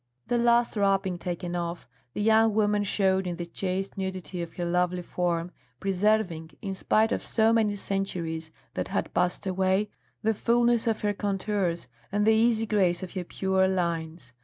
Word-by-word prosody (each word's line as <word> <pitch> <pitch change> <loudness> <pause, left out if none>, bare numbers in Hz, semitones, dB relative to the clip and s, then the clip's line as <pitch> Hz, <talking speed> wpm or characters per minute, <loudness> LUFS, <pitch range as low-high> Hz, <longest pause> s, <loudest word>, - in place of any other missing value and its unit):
The 240 - +2
last 235 0 +3
wrapping 195 -3 +1
taken 175 0 -4
off, 170 0 -4 0.3
the 210 - -1
young 220 0 +4
woman 210 -1 +2
showed 190 -1 +1
in 175 - -2
the 175 0 -5
chaste 190 +3 -3
nudity 185 -2 -4
of 170 - -7
her 175 - -2
lovely 180 +1 0
form, 175 -1 -1 0.3
preserving, 190 -4 0
in 195 -3 -4
spite 220 +3 +2
of - - 0
so 225 0 +2
many 215 -3 +2
centuries 175 -5 -3 0.2
that - - -2
had - - -2
passed 180 +3 0
away, 190 +2 +1 0.3
the 220 +1 +3
fulness 235 +1 +2
of 225 -1 0
her 205 -1 +1
contours, 195 -5 -1 0.2
and 205 +1 +1
the 220 - +6
easy 225 0 +3
grace 190 -5 +1
of 185 - -7
her 185 -2 -3
pure 190 +1 +1
lines. 165 -7 -2
190 Hz, 170 wpm, -27 LUFS, 175-210 Hz, 0.3 s, the